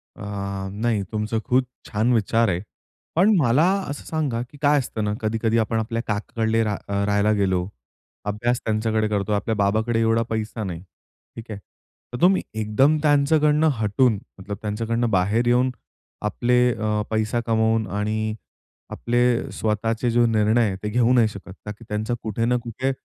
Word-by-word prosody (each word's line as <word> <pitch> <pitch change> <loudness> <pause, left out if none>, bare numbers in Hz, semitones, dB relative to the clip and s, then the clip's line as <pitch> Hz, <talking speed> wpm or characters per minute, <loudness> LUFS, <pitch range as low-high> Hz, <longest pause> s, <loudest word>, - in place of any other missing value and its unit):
अ, - - -13 0.5
नाही 110 0 -1
तुमचं 110 +1 -1
खूप 130 +1 +3 0.3
छान 110 +4 +1
विचार 115 +1 +2
आहे. 90 -1 -1 0.5
पण 200 +6 +5
मला 135 0 +3 0.3
असं 145 - -6
सांगा, 145 -8 -1
की 125 +4 -10
काय 145 0 +4
असतं 115 -4 -4
ना, 105 0 0
कधी-कधी 110 +1 0
आपण 110 0 0
आपल्या 115 +1 -2
काकाकडले 110 +2 0
रा 105 -2 -1
राहायला 100 +1 +1
गेलो, 95 -3 +1 0.6
अभ्यास 120 +4 0
त्यांच्याकडे 110 0 0
करतो, 105 -1 -1
आपल्या 105 +2 0
बाबाकडे 110 +3 +1
एवढा 115 0 +2
पैसा 110 0 -3
नाही, 90 -4 -5 0.5
ठीक 115 - -8
आहे. 100 - -6 0.5
तर 125 - -5
तुम्ही 185 +2 +5 0.2
एकदम 130 +8 +3
त्यांच्याकडनं 150 +1 +3
हटून, 110 +1 +2 0.2
मतलब 100 +1 -6
त्यांच्याकडनं 115 +3 -1
बाहेर 100 +5 +2
येऊन, 125 +1 +3 0.5
आपले 120 +4 +1 0.2
अ, 105 -1 -1
पैसा 110 +1 0
कमवून 110 -1 +1
आणि 110 +2 -2 0.6
आपले 120 0 +1
स्वतःचे 115 +2 -1
जो 120 +1 +4
निर्णय 110 +1 +3
आहेत 95 -3 -2
ते 105 - -1
घेऊ 120 +2 +3
नाही 120 -3 +5
शकत, 100 -3 -9
का 105 - -4
की 110 +3 -12
त्यांचा 105 +3 -2
कुठे 110 +1 -1
ना 125 +1 +2
कुठे 125 +3 -2
110 Hz, 160 wpm, -23 LUFS, 105-120 Hz, 0.6 s, पण